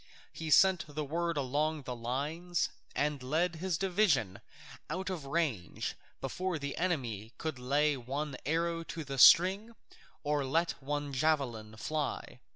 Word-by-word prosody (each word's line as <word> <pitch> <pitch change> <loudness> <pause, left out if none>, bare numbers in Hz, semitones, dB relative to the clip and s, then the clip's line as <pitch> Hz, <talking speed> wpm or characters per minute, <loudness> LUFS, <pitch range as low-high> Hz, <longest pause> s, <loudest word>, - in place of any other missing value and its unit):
He 160 -1 -5
sent 185 +2 +6
the 150 0 -4
word 170 +2 -1
along 145 +3 0
the 125 -1 -5
lines 150 +9 -2 0.3
and 145 -1 0
led 160 +6 0
his 180 -1 -1
division 175 - +1 0.5
out 190 +1 -3
of 160 -7 -5
range 135 - -1 0.3
before 180 +6 -2
the 140 -1 -4
enemy 120 - -2
could 155 -5 -4
lay 145 +4 +2
one 135 +3 -4
arrow 165 +3 0
to 160 - -5
the 135 -2 -5
string 190 - +7 0.5
or 145 -1 +1
let 165 +6 +1
one 145 +1 -3
javelin 130 -7 0
fly. 150 +6 -3
150 Hz, 140 wpm, -32 LUFS, 135-170 Hz, 0.5 s, string